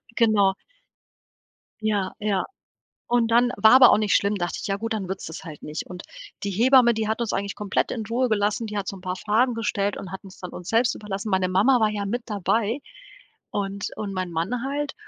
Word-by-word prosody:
Genau. 205 Hz, -4 st, +4 dB, 1.3 s
Ja, 205 Hz, -3 st, 0 dB
ja. 205 Hz, -2 st, 0 dB, 0.6 s
Und 235 Hz, -1 st, +2 dB
dann 245 Hz, +1 st, +4 dB
war 220 Hz, -, +6 dB
aber 255 Hz, -1 st, +9 dB
auch -, -, +5 dB
nicht 210 Hz, -2 st, +2 dB
schlimm, 200 Hz, +1 st, +2 dB
dachte 175 Hz, -2 st, -3 dB
ich: -, -, -4 dB
„Ja, 195 Hz, 0 st, -1 dB
gut, 225 Hz, +2 st, -3 dB
dann 200 Hz, -4 st, -3 dB
wird's 190 Hz, 0 st, -5 dB
das 160 Hz, -, -8 dB
halt 155 Hz, -4 st, -10 dB
nicht.“ 150 Hz, +1 st, -5 dB
Und 180 Hz, 0 st, -8 dB, 0.4 s
die 200 Hz, -, -2 dB
Hebamme, 240 Hz, +3 st, +5 dB
die 220 Hz, -1 st, -2 dB
hat 220 Hz, +2 st, -1 dB
uns 235 Hz, -3 st, -1 dB
eigentlich 200 Hz, 0 st, -2 dB
komplett 205 Hz, -2 st, -1 dB
in 225 Hz, -3 st, -3 dB
Ruhe 245 Hz, +3 st, 0 dB
gelassen, 210 Hz, +1 st, 0 dB
die 210 Hz, 0 st, -5 dB
hat 195 Hz, -, -3 dB
so 195 Hz, -, -4 dB
'n 185 Hz, -, -12 dB
paar 180 Hz, -1 st, -3 dB
Fragen 230 Hz, +5 st, +1 dB
gestellt 205 Hz, -3 st, -1 dB
und 185 Hz, -, -8 dB
hat 190 Hz, -, -7 dB
uns 190 Hz, -1 st, -13 dB
dann 180 Hz, -, -7 dB
uns 180 Hz, -, -8 dB
selbst 235 Hz, +2 st, +3 dB
überlassen. 210 Hz, 0 st, -5 dB
Meine 185 Hz, -1 st, +2 dB
Mama 220 Hz, +8 st, +4 dB
war 215 Hz, -1 st, +3 dB
ja 205 Hz, -1 st, -3 dB
mit 240 Hz, +5 st, -2 dB
dabei 215 Hz, +4 st, 0 dB, 0.7 s
und 200 Hz, 0 st, -3 dB
und 205 Hz, -2 st, -4 dB
mein 185 Hz, -2 st, -3 dB
Mann 190 Hz, +10 st, -2 dB
halt. 285 Hz, +1 st, -2 dB
210 Hz, 220 wpm, -24 LUFS, 195-230 Hz, 1.3 s, aber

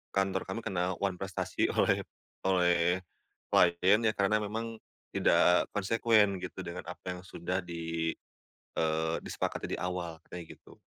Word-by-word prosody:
kantor 95 Hz, -1 st, +1 dB
kami 95 Hz, +5 st, -3 dB
kena 90 Hz, -1 st, -1 dB
wanprestasi 95 Hz, -1 st, -1 dB
oleh -, -, +3 dB, 0.5 s
oleh, 90 Hz, 0 st, +3 dB, 0.5 s
klien 90 Hz, +4 st, +5 dB
ya 110 Hz, -, +3 dB
karena 100 Hz, +2 st, +3 dB
memang, 115 Hz, +2 st, -4 dB, 0.4 s
tidak 90 Hz, 0 st, +4 dB
konsekuen 105 Hz, -2 st, +3 dB
gitu 90 Hz, -, -6 dB
dengan 90 Hz, 0 st, -5 dB
apa -, -, -12 dB
yang -, -, -9 dB
sudah 90 Hz, 0 st, -3 dB
di 85 Hz, -1 st, -2 dB, 0.7 s
eee, 80 Hz, +1 st, +1 dB
disepakati -, -, -3 dB
di -, -, -11 dB
awal 90 Hz, -2 st, -3 dB
katanya 90 Hz, -1 st, -8 dB
gitu. -, -, -18 dB
90 Hz, 130 wpm, -31 LUFS, 85-100 Hz, 0.7 s, klien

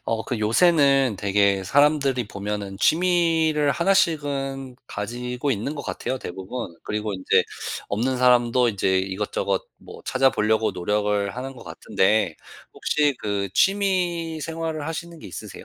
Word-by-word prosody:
어 115 Hz, -1 st, -1 dB
그 125 Hz, -, -3 dB
요새는 135 Hz, -, +3 dB
되게 100 Hz, -1 st, +2 dB
사람들이 140 Hz, -1 st, +2 dB
보면은 100 Hz, -1 st, -5 dB
취미를 165 Hz, -, +2 dB
1 195 Hz, +8 st, +2 dB
씩은 135 Hz, -6 st, -1 dB
가지고 125 Hz, +6 st, -4 dB
있는 125 Hz, +5 st, -2 dB
것 145 Hz, -, -6 dB
같아요, 130 Hz, -1 st, -4 dB
대부분. 95 Hz, +1 st, -6 dB
그리고 105 Hz, 0 st, -3 dB
인제 95 Hz, -1 st, +2 dB, 0.4 s
없는 125 Hz, +6 st, 0 dB
사람도 125 Hz, -1 st, +4 dB
인제 95 Hz, -3 st, +1 dB
이것저것 95 Hz, 0 st, -2 dB
뭐 -, -, -13 dB
찾아 130 Hz, 0 st, +3 dB
보려고 110 Hz, -1 st, +1 dB
노력을 105 Hz, +2 st, -1 dB
하는 135 Hz, +2 st, -5 dB
것 125 Hz, -, -12 dB
같은데 95 Hz, -3 st, +1 dB, 0.4 s
혹시 150 Hz, -2 st, +1 dB
그 100 Hz, -1 st, -2 dB
취미 180 Hz, -5 st, +1 dB
생활을 160 Hz, -1 st, -4 dB
하시는 165 Hz, +1 st, -6 dB
게 -, -, -11 dB
있으세요? 90 Hz, -, -9 dB
125 Hz, 300 characters per minute, -23 LUFS, 105-150 Hz, 0.4 s, 사람도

